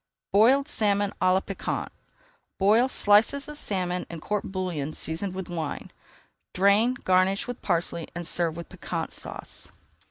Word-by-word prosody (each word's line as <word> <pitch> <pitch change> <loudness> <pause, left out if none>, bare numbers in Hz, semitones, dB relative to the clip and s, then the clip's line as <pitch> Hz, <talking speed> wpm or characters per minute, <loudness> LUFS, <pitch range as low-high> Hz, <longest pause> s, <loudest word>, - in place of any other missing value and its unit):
BOILED 260 +8 +5
SALMON 205 -6 +1
À 185 0 +4
LA 190 +1 +3
PIQUANT 195 - -4 0.7
Boil 215 +6 +4
slices 225 +5 +3
of 300 - -7
salmon 180 -8 -2
in 170 - -6
court 210 +5 -2
bouillon 175 -6 -3
seasoned 180 +4 -3
with 190 -1 -5
wine. 165 -4 -5 0.6
Drain, 200 +6 +4
garnish 185 +5 +3
with 245 -1 -6
parsley, 170 -2 -1
and 175 0 -4
serve 165 -1 +1
with 170 - -7
Piquant - - -5
Sauce. - - -8
190 Hz, 145 wpm, -26 LUFS, 175-210 Hz, 0.7 s, BOILED